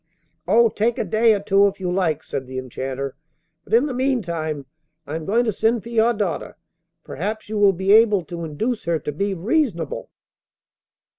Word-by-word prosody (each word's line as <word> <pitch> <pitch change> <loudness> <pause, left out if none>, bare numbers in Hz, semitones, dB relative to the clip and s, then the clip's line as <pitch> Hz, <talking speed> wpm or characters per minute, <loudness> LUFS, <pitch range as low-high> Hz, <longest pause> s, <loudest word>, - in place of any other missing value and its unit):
'Oh! 230 +4 +5
take 225 +3 0
a - - 0
day 220 +3 +3
or - - -2
two 200 0 +4
if 195 - -4
you 180 -2 -2
like,' 165 -5 0
said 135 -2 -5
the 130 0 -6
Enchanter; 130 +1 -4 0.5
'but - - -10
in 245 +5 +4
the 285 - -3
meantime, 170 - -1 0.4
I 150 - -5
am 160 -1 -5
going 230 +7 +2
to 220 - 0
send 225 +1 +1
for 235 - -9
your 230 0 +3
daughter. 205 -7 -3 0.5
Perhaps 210 +8 -5
you 215 -1 -2
will 200 -1 +6
be 190 +2 0
able 210 -3 +5
to 170 0 -6
induce 220 +10 -3
her 170 -1 +1
to 150 - -5
be 195 +6 -2
reasonable. 190 - -1
195 Hz, 190 wpm, -22 LUFS, 160-225 Hz, 0.5 s, will